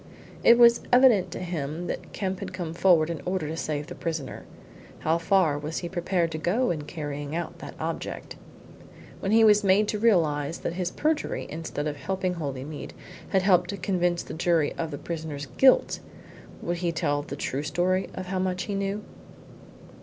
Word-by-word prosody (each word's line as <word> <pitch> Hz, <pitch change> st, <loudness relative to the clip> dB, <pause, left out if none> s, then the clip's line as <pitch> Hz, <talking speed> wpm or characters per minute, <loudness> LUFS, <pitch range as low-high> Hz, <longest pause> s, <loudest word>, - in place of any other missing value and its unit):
It 235 Hz, -, +8 dB
was 235 Hz, -1 st, +7 dB
evident 245 Hz, -6 st, +6 dB
to -, -, -6 dB
him 170 Hz, -2 st, -4 dB
that -, -, -5 dB
Kemp 190 Hz, -2 st, -3 dB
had 190 Hz, -2 st, -6 dB
come 175 Hz, -3 st, -4 dB
forward 170 Hz, -2 st, +4 dB
in 165 Hz, -, -5 dB
order 180 Hz, -4 st, -2 dB
to 160 Hz, -, -4 dB
save 150 Hz, -2 st, -3 dB
the -, -, -8 dB
prisoner. 155 Hz, -6 st, -5 dB, 0.6 s
How 160 Hz, +2 st, +2 dB
far 165 Hz, -4 st, +2 dB
was 155 Hz, +2 st, -4 dB
he -, -, -4 dB
prepared 175 Hz, -2 st, 0 dB
to 155 Hz, -, -4 dB
go 215 Hz, +10 st, +1 dB
in 150 Hz, -3 st, -4 dB
carrying 145 Hz, -1 st, -5 dB
out 170 Hz, -, -4 dB
that -, -, -9 dB
object? -, -, -4 dB, 0.8 s
When 195 Hz, -, -2 dB
he 225 Hz, +1 st, +6 dB
was 210 Hz, -1 st, +6 dB
made 200 Hz, +2 st, +4 dB
to 210 Hz, -, -1 dB
realise 165 Hz, -8 st, +2 dB
that -, -, -3 dB
his 180 Hz, 0 st, -2 dB
perjury, 305 Hz, +9 st, -1 dB
instead 155 Hz, -2 st, -4 dB
of 150 Hz, -1 st, -3 dB
helping 185 Hz, +5 st, -2 dB
Holymead, 145 Hz, -2 st, -5 dB, 0.4 s
had 190 Hz, -2 st, +2 dB
helped 180 Hz, -2 st, +4 dB
to 200 Hz, -, -3 dB
convince 175 Hz, -2 st, 0 dB
the -, -, -8 dB
jury 165 Hz, -2 st, +1 dB
of 165 Hz, -, -3 dB
the 145 Hz, -, -5 dB
prisoner's 155 Hz, -3 st, -5 dB
guilt, 260 Hz, -, +4 dB, 0.6 s
would 175 Hz, +1 st, -1 dB
he 170 Hz, -1 st, 0 dB
tell 145 Hz, -3 st, 0 dB
the 145 Hz, -, -7 dB
true 135 Hz, 0 st, -2 dB
story 180 Hz, +5 st, 0 dB
of 185 Hz, -, -5 dB
how 185 Hz, +1 st, -2 dB
much 185 Hz, 0 st, -1 dB
he 205 Hz, -, -4 dB
knew? 200 Hz, +1 st, -2 dB
175 Hz, 185 wpm, -26 LUFS, 155-190 Hz, 0.8 s, It